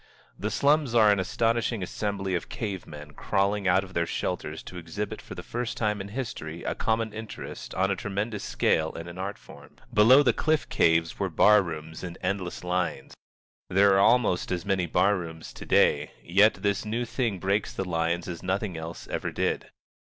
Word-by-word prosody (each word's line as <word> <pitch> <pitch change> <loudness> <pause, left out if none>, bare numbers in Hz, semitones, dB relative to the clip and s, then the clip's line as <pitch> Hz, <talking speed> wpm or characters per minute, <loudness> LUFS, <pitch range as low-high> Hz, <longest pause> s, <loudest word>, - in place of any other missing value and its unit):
The 105 - -3
slums 140 +1 +2
are 110 -3 +7
an 100 - +2
astonishing 115 +2 0
assembly 100 0 -3
of 85 - -2
cave 100 -5 -4
men 75 0 -10
crawling 100 +2 0
out 95 +2 +4
of 95 -1 -11
their 85 -1 0
shelters - - -3
to 90 - -9
exhibit 95 +5 -5
for - - -10
the - - -7
first 120 0 -4
time 105 -2 0
in 95 - -6
history 100 -8 -5
a - - -1
common 110 -1 -1
interest 110 0 -7
on 95 +1 +2
a - - +1
tremendous 100 +2 -3
scale 80 +6 +1
in 85 +1 -7
an 85 +1 -9
art 100 +2 -4
form. - - -15 0.2
Below 125 +7 +7
the 120 -4 +3
cliff 155 +5 +1
caves 80 0 +2
were - - 0
bar 105 0 +6
rooms 80 -2 -7
in 85 -2 -6
endless 90 -2 -2
lines. 90 -6 -2 0.6
There 100 +2 +5
are 95 - +4
almost 110 -5 +3
as 90 -2 -2
many 95 -3 +1
bar 95 +5 +3
rooms 80 -3 -7
to - - -10
day, 75 0 +3
yet 100 +5 +4
this 100 +1 -1
new 115 +3 -2
thing 115 -4 -1
breaks 100 +3 0
the 95 - -3
lines 85 0 -1
as 85 -2 -6
nothing 95 0 -2
else 80 +1 -7
ever - - -3
did. - - -1
95 Hz, 190 wpm, -27 LUFS, 85-105 Hz, 0.6 s, are